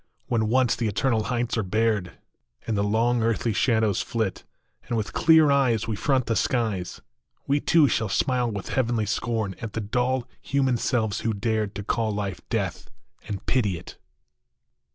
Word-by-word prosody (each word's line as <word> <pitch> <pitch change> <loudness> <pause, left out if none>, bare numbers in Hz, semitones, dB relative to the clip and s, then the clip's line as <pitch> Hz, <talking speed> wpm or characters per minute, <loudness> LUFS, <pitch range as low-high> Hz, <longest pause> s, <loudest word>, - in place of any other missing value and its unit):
When 110 -2 0
once 125 0 +3
the 115 - -1
eternal 110 +1 0
heights 120 -1 -1
are - - +2
bared, 105 -2 0 0.5
And 115 - -1
the 100 - +1
long 115 +3 +2
earthly 115 0 0
shadows 110 -4 +2
flit, 110 -5 -2 0.4
And 120 - -1
with 110 - -3
clear 160 -2 +5
eyes 125 -7 +2
we 110 - -1
front 130 +3 +1
the 115 - 0
skies, 110 -9 -1 0.4
We 140 +1 +2
too 160 0 +4
shall 110 -5 0
smile 125 +4 +1
with 100 -3 -5
heavenly 120 -4 0
scorn 110 -1 -1
At 115 -3 -5
the - - -2
dull, 125 +4 -1
human 135 -3 +1
selves 110 -4 0
who 115 -2 -1
dared 105 0 -1
To 100 - -4
call 110 +2 0
life 100 -3 -3
" - - -47
Death - - -2
" 60 +1 -25
and 100 0 -5
pity 105 -9 +1
it - - -12
115 Hz, 175 wpm, -25 LUFS, 105-125 Hz, 0.5 s, clear